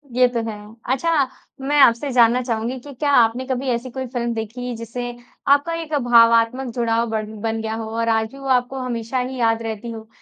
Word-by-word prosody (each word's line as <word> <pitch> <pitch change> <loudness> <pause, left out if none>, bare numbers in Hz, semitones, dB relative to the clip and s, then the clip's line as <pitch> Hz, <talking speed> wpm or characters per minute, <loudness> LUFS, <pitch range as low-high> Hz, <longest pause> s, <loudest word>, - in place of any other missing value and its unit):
ये 250 0 +5
तो 240 -1 -2
है। 215 - -5 0.4
अच्छा, 330 +6 0 0.5
मैं 290 +2 +1
आपसे 235 +2 +5
ये - - -3
जानना 240 +1 +5
चाहूँगी 240 +1 -2
कि 285 +2 -11
क्या 285 +3 0
आपने 245 0 +3
कभी 260 0 -2
ऐसी 240 +1 -2
कोई 260 0 -4
फ़िल्म 240 -1 -2
देखी, 235 +2 -5
जिससे 235 +2 -5 0.4
आपका 285 +4 +3
एक 310 -1 -8
भावात्मक 230 +1 +4
जुड़ाव 230 -1 +1
बढ़ 215 -1 -2 0.2
बन 225 0 -2
गया 220 0 -3
हो 220 -1 -5
और 230 0 +1
आज 220 0 +1
भी 275 - -12
वो 275 - -7
आपको 255 +1 +1
हमेशा 245 0 -3
ही 255 +1 -3
याद 225 0 +2
रहती 225 +1 -5
हो? 220 -1 -9
240 Hz, 210 wpm, -21 LUFS, 225-260 Hz, 0.5 s, ये